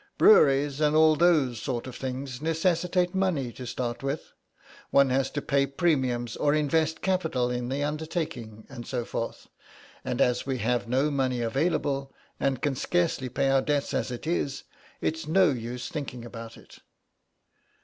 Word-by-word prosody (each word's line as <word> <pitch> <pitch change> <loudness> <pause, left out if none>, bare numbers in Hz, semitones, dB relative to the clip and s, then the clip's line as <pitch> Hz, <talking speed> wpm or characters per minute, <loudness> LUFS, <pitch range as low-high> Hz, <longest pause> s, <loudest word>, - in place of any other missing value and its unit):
"Breweries 145 - +5
and 150 0 +3
all 155 0 +6
those 150 -8 +3
sort 125 -4 -3
of 130 - -8
things 130 0 -5
necessitate 175 +2 +1
money 180 -10 0
to 125 - -8
start 120 0 -3
with; 140 +2 -4 0.6
one 140 -1 +4
has 135 +1 +1
to 145 - -4
pay 140 0 +2
premiums 130 -6 0
or 145 0 +2
invest 155 +1 +1
capital 160 -10 0
in 125 0 -3
the 140 +2 -1
undertaking, 150 - -4
and 120 -4 -9
so 120 -3 -2
forth. 115 - -5 0.6
And - - -3
as 125 0 +2
we 135 -1 -2
have 120 -1 0
no 135 +5 +1
money 130 -3 0
available, 135 +2 0 0.3
and 135 -2 -1
can 145 - +1
scarcely 160 -2 0
pay 135 +2 +1
our 135 0 +4
debts 145 0 -1
as 120 - -1
it 125 +3 -6
is, 145 -4 -1 0.4
it's 160 -1 -2
no 180 +1 +4
use 120 0 -5
thinking 130 -6 -6
about 115 -1 -9
it." - - -16
135 Hz, 160 wpm, -27 LUFS, 125-155 Hz, 0.6 s, all